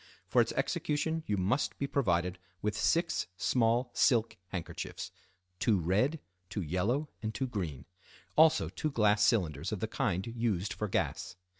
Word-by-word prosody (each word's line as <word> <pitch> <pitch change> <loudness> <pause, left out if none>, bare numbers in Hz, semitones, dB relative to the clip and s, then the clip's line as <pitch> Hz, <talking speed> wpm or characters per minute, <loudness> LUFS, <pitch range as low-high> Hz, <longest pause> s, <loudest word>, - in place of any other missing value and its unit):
For - - +4
its - - 0
execution 160 +2 0
you 105 - +1
must 100 +10 0
be 140 - -1
provided 90 -10 0 0.2
with 105 0 0
six 170 +1 +1
small 120 +3 +2
silk 115 -4 +3
handkerchiefs 90 -3 -5 0.5
(two 105 0 +3
red, 105 - +1 0.3
two 95 0 -3
yellow, 105 - 0
and 110 - -2
two 135 - 0
green), 85 - -4 0.5
also 160 0 +5
two 155 - -3
glass 105 -6 +3
cylinders 85 - +1
of 105 - -2
the 110 - -1
kind 100 - -1
used 110 -4 -1
for 105 - -3
gas. 90 - -2
110 Hz, 150 wpm, -32 LUFS, 95-130 Hz, 0.5 s, also